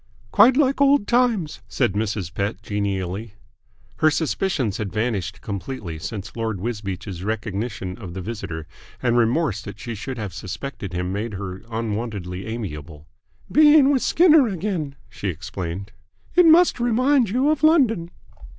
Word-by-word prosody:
"Quite 240 Hz, +5 st, +6 dB
like 275 Hz, -1 st, +2 dB
old 280 Hz, -5 st, +5 dB
times," 230 Hz, -11 st, +1 dB
said 120 Hz, -8 st, 0 dB
Mrs. 100 Hz, -4 st, -2 dB
Pett 100 Hz, +1 st, -3 dB
genially. 100 Hz, 0 st, -3 dB, 0.6 s
Her 155 Hz, -, +4 dB
suspicions 150 Hz, -, -1 dB
had 105 Hz, -3 st, -4 dB
vanished 105 Hz, -3 st, -2 dB
completely 100 Hz, -5 st, -5 dB
since 95 Hz, +3 st, -6 dB
Lord 110 Hz, -4 st, -2 dB
Wisbeach's 100 Hz, -4 st, -4 dB
recognition 105 Hz, -1 st, -3 dB
of 90 Hz, -5 st, -8 dB
the 95 Hz, -, -4 dB
visitor, 85 Hz, -7 st, -5 dB, 0.4 s
and 120 Hz, -1 st, +2 dB
remorse 120 Hz, -, +2 dB
that 100 Hz, -, -9 dB
she 120 Hz, -, -5 dB
should 125 Hz, +4 st, -6 dB
have 100 Hz, -5 st, -5 dB
suspected 100 Hz, +1 st, -6 dB
him 90 Hz, +1 st, -2 dB
made 105 Hz, +1 st, -3 dB
her 95 Hz, -1 st, -6 dB
unwontedly 105 Hz, -5 st, -4 dB
amiable. 80 Hz, -9 st, -6 dB, 0.5 s
"Being 295 Hz, -2 st, +7 dB
with 265 Hz, -3 st, +2 dB
Skinner 320 Hz, -6 st, +5 dB
again," 180 Hz, -7 st, -3 dB
she 105 Hz, -, -6 dB
explained. 95 Hz, +2 st, -5 dB, 0.4 s
"It 355 Hz, -1 st, +6 dB
must 335 Hz, -2 st, +6 dB
remind 245 Hz, +1 st, +3 dB
you 260 Hz, +8 st, +2 dB
of 310 Hz, -, -1 dB
London." 255 Hz, -, +4 dB
110 Hz, 140 wpm, -23 LUFS, -, 0.6 s, Being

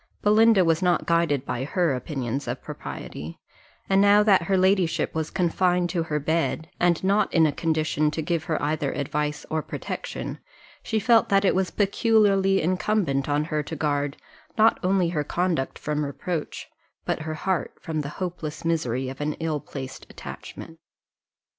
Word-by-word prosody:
Belinda 215 Hz, -2 st, +5 dB
was 165 Hz, +1 st, +2 dB
not 180 Hz, -1 st, +2 dB
guided 165 Hz, -5 st, +1 dB
by 125 Hz, -1 st, -3 dB
her 165 Hz, +1 st, +1 dB
opinions 130 Hz, -1 st, -3 dB
of -, -, -4 dB
propriety; 80 Hz, +3 st, -7 dB, 0.5 s
and 195 Hz, 0 st, +4 dB
now 205 Hz, +1 st, +6 dB
that 200 Hz, -4 st, +5 dB
her 190 Hz, +3 st, +1 dB
ladyship 185 Hz, -2 st, +2 dB
was 160 Hz, -1 st, -2 dB
confined 180 Hz, -1 st, +1 dB
to 175 Hz, -, 0 dB
her 155 Hz, -2 st, -1 dB
bed, 160 Hz, +1 st, -1 dB
and 175 Hz, -1 st, +2 dB
not 200 Hz, +1 st, +2 dB
in 165 Hz, -1 st, +4 dB
a 155 Hz, -, +2 dB
condition 155 Hz, -1 st, 0 dB
to 155 Hz, +2 st, -3 dB
give 165 Hz, -1 st, -1 dB
her 155 Hz, -, -1 dB
either 150 Hz, -1 st, 0 dB
advice 150 Hz, +2 st, -2 dB
or 160 Hz, 0 st, 0 dB
protection, -, -, -5 dB, 0.4 s
she 220 Hz, -, -2 dB
felt 230 Hz, +1 st, +4 dB
that 195 Hz, 0 st, +3 dB
it -, -, +4 dB
was 185 Hz, -1 st, +1 dB
peculiarly 200 Hz, -3 st, +3 dB
incumbent 175 Hz, -6 st, 0 dB
on 145 Hz, +1 st, +2 dB
her 155 Hz, -1 st, -1 dB
to 155 Hz, +2 st, -6 dB
guard, 145 Hz, -1 st, -1 dB, 0.4 s
not 220 Hz, +1 st, +5 dB
only 185 Hz, -2 st, +2 dB
her 155 Hz, -4 st, -1 dB
conduct 170 Hz, -3 st, -1 dB
from 150 Hz, 0 st, -2 dB
reproach, 150 Hz, +3 st, -4 dB, 0.4 s
but -, -, -1 dB
her 155 Hz, 0 st, -4 dB
heart 190 Hz, +2 st, -2 dB
from 155 Hz, -2 st, -3 dB
the 140 Hz, -, -5 dB
hopeless 170 Hz, -4 st, -5 dB
misery 130 Hz, -6 st, 0 dB
of 130 Hz, +2 st, -7 dB
an 150 Hz, +1 st, -1 dB
ill 160 Hz, -2 st, -2 dB
placed 130 Hz, -2 st, -8 dB
attachment. 165 Hz, 0 st, -9 dB
165 Hz, 165 wpm, -25 LUFS, 150-190 Hz, 0.5 s, now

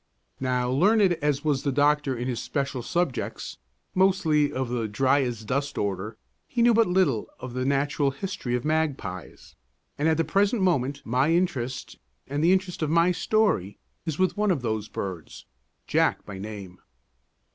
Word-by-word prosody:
Now, 125 Hz, -1 st, 0 dB
learned 195 Hz, -, +4 dB
as 145 Hz, -1 st, 0 dB
was 145 Hz, -3 st, +1 dB
the 140 Hz, -, 0 dB
doctor 145 Hz, -1 st, +2 dB
in 120 Hz, +2 st, -3 dB
his 125 Hz, -3 st, -2 dB
special 140 Hz, -3 st, -2 dB
subjects 170 Hz, +1 st, -2 dB, 0.3 s
mostly 185 Hz, -6 st, +3 dB
of 130 Hz, 0 st, -2 dB
the 120 Hz, -2 st, -1 dB
dry 135 Hz, +6 st, +2 dB
as 120 Hz, -4 st, -3 dB
dust 140 Hz, +5 st, -2 dB
order 100 Hz, +2 st, -2 dB, 0.3 s
he 240 Hz, -2 st, 0 dB
knew 240 Hz, 0 st, +6 dB
but 225 Hz, 0 st, +4 dB
little 180 Hz, -, +2 dB
of 125 Hz, -1 st, -7 dB
the 130 Hz, 0 st, -2 dB
natural 140 Hz, +1 st, +1 dB
history 135 Hz, -4 st, -3 dB
of 125 Hz, -, -3 dB
magpies; 140 Hz, -, -3 dB, 0.5 s
and 150 Hz, -, +2 dB
at 160 Hz, -, +2 dB
the 165 Hz, -, +2 dB
present 200 Hz, +4 st, +1 dB
moment 140 Hz, -6 st, +1 dB
my 130 Hz, +6 st, +2 dB
interest 135 Hz, -8 st, -1 dB, 0.3 s
and 145 Hz, +2 st, -2 dB
the 170 Hz, -, +5 dB
interest 185 Hz, -2 st, 0 dB
of 155 Hz, -, 0 dB
my 170 Hz, +2 st, +4 dB
story 180 Hz, -, +1 dB, 0.3 s
is 160 Hz, -3 st, -3 dB
with 185 Hz, 0 st, +1 dB
one 210 Hz, 0 st, +1 dB
of 155 Hz, -9 st, 0 dB
those 110 Hz, -2 st, -2 dB
birds, 90 Hz, -5 st, -6 dB, 0.4 s
Jack -, -, +1 dB
by 100 Hz, -2 st, -8 dB
name. 100 Hz, -3 st, -8 dB
140 Hz, 170 wpm, -26 LUFS, 125-175 Hz, 0.5 s, knew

